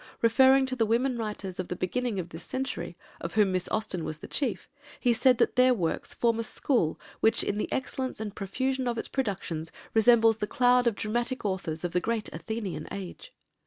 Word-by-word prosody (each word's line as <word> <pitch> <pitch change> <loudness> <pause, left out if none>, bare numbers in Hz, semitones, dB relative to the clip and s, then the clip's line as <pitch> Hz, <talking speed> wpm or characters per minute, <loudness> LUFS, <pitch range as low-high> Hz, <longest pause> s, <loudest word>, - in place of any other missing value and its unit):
Referring 265 +4 +6
to 260 0 -3
the 225 -3 +1
women 245 +4 +2
writers 210 -5 -5
of 185 - -2
the 180 - -3
beginning 210 +4 -1
of 175 -1 -5
this 165 +1 -9
century, 175 -10 -4 0.2
of 170 - -6
whom 210 -3 +4
Miss 185 -1 -1
Austen 215 -6 -2
was 155 - -4
the - - -10
chief, 270 -6 -2 0.3
he 245 -2 +3
said 250 +1 +4
that - - +2
their 255 0 +5
works 170 -6 -2
"form 230 -1 +1
a - - 0
school 225 - 0 0.2
which, 220 - +3
in 205 - -1
the - - -3
excellence 260 -1 -2
and 215 -1 -5
profusion 260 +6 -1
of 235 -1 -1
its - - 0
productions, 180 - -3 0.2
resembles 225 0 +5
the 210 - -2
cloud 245 +1 +4
of 230 - +2
dramatic 240 +4 -2
authors 180 -5 -2
of 175 - -1
the 180 - +2
great 225 0 -2
Athenian 205 +3 -4
age." 200 - -7
225 Hz, 200 wpm, -28 LUFS, 185-250 Hz, 0.3 s, Referring